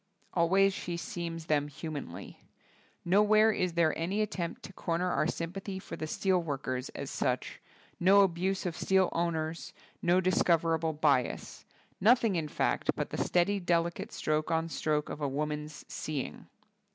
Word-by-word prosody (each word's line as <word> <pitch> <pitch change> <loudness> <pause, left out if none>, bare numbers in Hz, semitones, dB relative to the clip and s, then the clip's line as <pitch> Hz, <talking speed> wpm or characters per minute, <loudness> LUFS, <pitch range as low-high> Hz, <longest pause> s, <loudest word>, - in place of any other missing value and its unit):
Al 170 -2 +3
ways 195 +1 +4
she 175 -2 -4
seems 170 -1 -5
them 145 -2 +1
humanly. 150 0 -7 0.6
No 190 +4 +5
where 215 +1 +5
is 180 -4 -1
there 165 -2 +2
any 185 +6 -1
attempt 175 -5 -4
to 195 - -9
corner 175 +1 -1
our 155 - +1
sympathy 190 +4 -4
for 190 - -7
the 155 - -4
steel 185 +2 +1
workers 135 -5 -3
as - - -5
such, - - -2 0.4
no 195 +3 +6
abuse 190 +1 0
of 175 -3 -2
steel 190 0 +2
owners, 165 -1 -2 0.3
no 175 +2 +4
dis 185 -1 +2
coverable 165 -2 +1
bias; 140 -5 0 0.3
nothing 230 -1 +4
in 160 -3 -1
fact, - - -1
but - - -3
the - - -1
steady, 190 +3 +2
delicate 170 -1 0
stroke 155 0 -1
on 165 0 0
stroke 150 -2 0
of 150 - -6
a 145 - +1
woman's 150 +1 -4
seeing. 150 -4 -5
170 Hz, 160 wpm, -31 LUFS, 155-185 Hz, 0.6 s, no